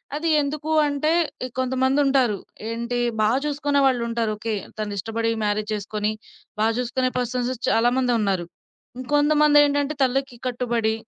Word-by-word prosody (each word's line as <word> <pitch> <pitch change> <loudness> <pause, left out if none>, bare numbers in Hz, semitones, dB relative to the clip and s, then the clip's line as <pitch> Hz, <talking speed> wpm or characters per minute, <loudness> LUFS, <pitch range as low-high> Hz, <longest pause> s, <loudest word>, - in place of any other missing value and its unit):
అది 325 +2 -1
ఎందుకు 300 +2 -4 0.2
అంటే 285 +2 0 0.4
ఇంకొంతమందుంటారు, 260 -2 +1 0.3
ఏంటి 235 +1 -3 0.2
బా 210 - +4 0.2
చూసుకునే 290 -1 0
వాళ్ళుంటారు. 235 -3 0
ఓకే 220 +1 -3 0.2
తను 210 -1 -3
ఇష్టపడి 225 +3 -1
మ్యారేజ్ 210 0 -1
చేసుకొని 210 +1 -2 0.5
బా 215 - +3
చూసుకునే 255 +1 0
పర్సన్స్ 250 0 -1 0.2
చాలా 235 +2 +3
మందే 250 -2 +2
ఉన్నారు. 190 -4 0 0.5
ఇంకొంతమందేంటంటే 290 +1 +3
తల్లికి 260 -1 -1
కట్టుబడి 235 -3 0
250 Hz, 120 wpm, -23 LUFS, 225-280 Hz, 0.5 s, బా